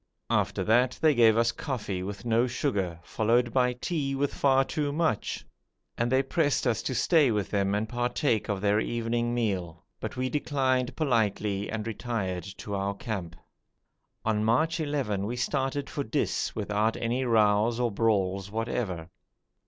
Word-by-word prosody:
After -, -, +1 dB
that 120 Hz, +3 st, +3 dB
they 155 Hz, -1 st, +4 dB
gave 115 Hz, -3 st, +5 dB
us 115 Hz, 0 st, +3 dB
coffee 115 Hz, -, -4 dB
with 100 Hz, +4 st, -6 dB
no 115 Hz, +1 st, +3 dB
sugar, 100 Hz, -, -1 dB
followed 120 Hz, +5 st, +1 dB
by 125 Hz, -1 st, +3 dB
tea 135 Hz, +1 st, -2 dB
with 140 Hz, +1 st, 0 dB
far 135 Hz, -1 st, +3 dB
too 145 Hz, 0 st, -2 dB
much, 155 Hz, -6 st, -1 dB, 0.5 s
and 120 Hz, +1 st, 0 dB
they 130 Hz, +1 st, +4 dB
pressed 145 Hz, +1 st, +1 dB
us 115 Hz, -3 st, +1 dB
to 130 Hz, -, -3 dB
stay 155 Hz, -3 st, +4 dB
with 105 Hz, -3 st, -1 dB
them 100 Hz, -1 st, +1 dB
and 105 Hz, +2 st, -1 dB
partake 120 Hz, -1 st, 0 dB
of 100 Hz, -2 st, -1 dB
their 105 Hz, +1 st, +3 dB
evening 120 Hz, +1 st, -1 dB
meal, 90 Hz, -8 st, -2 dB
but -, -, -5 dB
we 130 Hz, 0 st, 0 dB
declined 130 Hz, -3 st, 0 dB
politely 105 Hz, -7 st, 0 dB
and 110 Hz, -2 st, -3 dB
retired 105 Hz, -6 st, -3 dB
to 100 Hz, -, -6 dB
our 100 Hz, 0 st, -1 dB
camp. 95 Hz, -6 st, -5 dB, 0.9 s
On 110 Hz, -1 st, +1 dB
March 155 Hz, +10 st, +2 dB
11 135 Hz, -10 st, -1 dB
we 120 Hz, -, -3 dB
started 135 Hz, +3 st, -1 dB
for 140 Hz, -, -3 dB
Dis 110 Hz, -, -1 dB
without 105 Hz, +2 st, 0 dB
any 120 Hz, +3 st, -1 dB
rows 110 Hz, 0 st, +3 dB
or 120 Hz, -2 st, +1 dB
brawls 100 Hz, -3 st, +1 dB
whatever. 105 Hz, -6 st, -3 dB
115 Hz, 160 wpm, -28 LUFS, 105-130 Hz, 0.9 s, gave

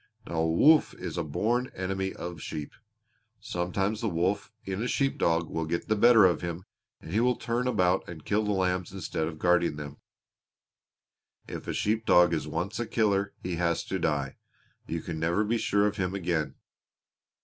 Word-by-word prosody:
Now 85 Hz, -, -5 dB
a 80 Hz, 0 st, +2 dB
wolf 150 Hz, -, +5 dB
is -, -, -6 dB
a -, -, -1 dB
born 120 Hz, +4 st, 0 dB
enemy 95 Hz, +1 st, -2 dB
of 85 Hz, -2 st, -7 dB
sheep. 75 Hz, -2 st, -6 dB, 0.7 s
Sometimes 95 Hz, +5 st, -2 dB
the 115 Hz, -, 0 dB
wolf 95 Hz, +5 st, -1 dB
in 95 Hz, +1 st, -3 dB
a 120 Hz, -, -1 dB
shepherd 135 Hz, +1 st, 0 dB
dog 85 Hz, 0 st, +2 dB
will 80 Hz, -1 st, -3 dB
get 85 Hz, +4 st, -3 dB
the 110 Hz, -, +3 dB
better 115 Hz, -1 st, +7 dB
of 90 Hz, -4 st, +2 dB
him 85 Hz, +1 st, -4 dB, 0.4 s
and 80 Hz, -, -9 dB
he 105 Hz, -, +3 dB
will 125 Hz, +1 st, +3 dB
turn 120 Hz, +2 st, -2 dB
about 90 Hz, -7 st, +1 dB
and 80 Hz, -3 st, -9 dB
kill 105 Hz, +1 st, +1 dB
the 105 Hz, -, 0 dB
lambs 90 Hz, -2 st, 0 dB
instead 85 Hz, -4 st, -3 dB
of 80 Hz, -1 st, -6 dB
guarding 90 Hz, -1 st, +2 dB
them. 75 Hz, -1 st, -7 dB, 1.5 s
If -, -, -7 dB
a -, -, -2 dB
sheep 110 Hz, +1 st, 0 dB
dog 90 Hz, -1 st, +6 dB
is 75 Hz, -2 st, -1 dB
once 85 Hz, +8 st, -3 dB
a 120 Hz, -, -2 dB
killer 100 Hz, -3 st, +1 dB
he 90 Hz, -2 st, -3 dB
has 85 Hz, -1 st, 0 dB
to 95 Hz, -, -3 dB
die. 70 Hz, -5 st, -1 dB, 0.5 s
You 85 Hz, 0 st, -3 dB
can 80 Hz, -2 st, -5 dB
never 85 Hz, +6 st, +1 dB
be 115 Hz, +2 st, 0 dB
sure 100 Hz, -1 st, +2 dB
of 105 Hz, 0 st, -1 dB
him 95 Hz, -1 st, -1 dB
again. 85 Hz, -5 st, -1 dB
90 Hz, 190 wpm, -28 LUFS, 85-105 Hz, 1.5 s, better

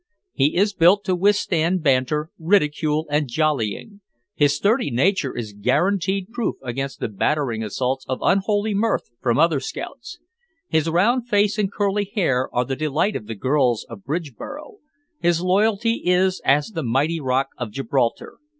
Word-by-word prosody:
He 140 Hz, +3 st, +1 dB
is 205 Hz, +2 st, +2 dB
built 190 Hz, +3 st, +4 dB
to 185 Hz, -3 st, 0 dB
withstand 180 Hz, -3 st, +1 dB
banter, 150 Hz, +3 st, +1 dB
ridicule 155 Hz, -3 st, +1 dB
and 150 Hz, -1 st, +1 dB
jollying; 155 Hz, -, -1 dB, 0.3 s
his 145 Hz, -1 st, +2 dB
sturdy 220 Hz, -, +1 dB
nature 140 Hz, +3 st, 0 dB
is 110 Hz, -3 st, -5 dB
guaranteed 185 Hz, -, 0 dB
proof 240 Hz, -1 st, -2 dB
against 135 Hz, +2 st, -4 dB
the -, -, -2 dB
battering 115 Hz, +2 st, -1 dB
assaults 130 Hz, +5 st, -2 dB
of 130 Hz, -, -1 dB
unholy 205 Hz, +2 st, +1 dB
mirth 215 Hz, -, 0 dB
from 120 Hz, -1 st, +1 dB
other 160 Hz, -2 st, +3 dB
scouts; 280 Hz, -, -7 dB, 0.5 s
his 160 Hz, 0 st, +1 dB
round 230 Hz, +9 st, +2 dB
face 210 Hz, 0 st, +2 dB
and 200 Hz, -2 st, 0 dB
curly 205 Hz, 0 st, -1 dB
hair 135 Hz, -, +1 dB
are 125 Hz, +1 st, 0 dB
the 135 Hz, -, -3 dB
delight 155 Hz, +8 st, 0 dB
of 105 Hz, -, -5 dB
the 115 Hz, -, -5 dB
girls 130 Hz, 0 st, +1 dB
of 100 Hz, -4 st, -9 dB
Bridgeboro; 165 Hz, -, -6 dB, 0.4 s
his 170 Hz, -1 st, +2 dB
loyalty 215 Hz, +4 st, +1 dB
is 185 Hz, +1 st, +2 dB
as 145 Hz, +5 st, +2 dB
the 175 Hz, -7 st, -4 dB
mighty 145 Hz, +6 st, 0 dB
rock 135 Hz, -1 st, 0 dB
of 120 Hz, -3 st, -3 dB
Gibraltar. 120 Hz, +1 st, -2 dB
160 Hz, 155 wpm, -22 LUFS, 130-200 Hz, 0.5 s, built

